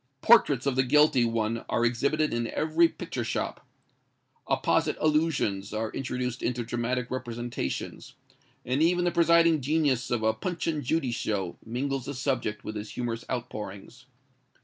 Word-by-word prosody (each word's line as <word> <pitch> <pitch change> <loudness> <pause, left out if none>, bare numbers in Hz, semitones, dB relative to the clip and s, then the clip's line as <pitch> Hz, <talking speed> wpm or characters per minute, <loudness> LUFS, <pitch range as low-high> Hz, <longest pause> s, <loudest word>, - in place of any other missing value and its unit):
Portraits 145 - +5
of 140 -2 +1
the 130 - +4
guilty 140 -1 +4
one 115 0 -1
are 120 - +1
exhibited 140 +6 +1
in 120 0 -1
every 160 +5 +3
picture - - -5
shop. - - -3 0.8
Apposite - - +1
allusions 150 -11 0
are 110 0 -2
introduced 125 -2 -3
into 120 0 -1
dramatic 120 +1 -2
representations; 120 - -4 0.5
and 130 +4 0
even 175 +2 +3
the 175 - +2
presiding 170 -2 +4
genius 140 -3 +1
of 120 -2 -1
a 110 0 +3
"Punch 170 +9 -4
and 155 -3 -1
Judy 135 -1 0
show" 100 -6 -2
mingles 130 +3 -3
the 140 - -5
subject 120 -5 -2
with 110 - -6
his 105 0 -6
humorous 120 -2 -4
outpourings. 120 0 -6
125 Hz, 150 wpm, -27 LUFS, 115-150 Hz, 0.8 s, Portraits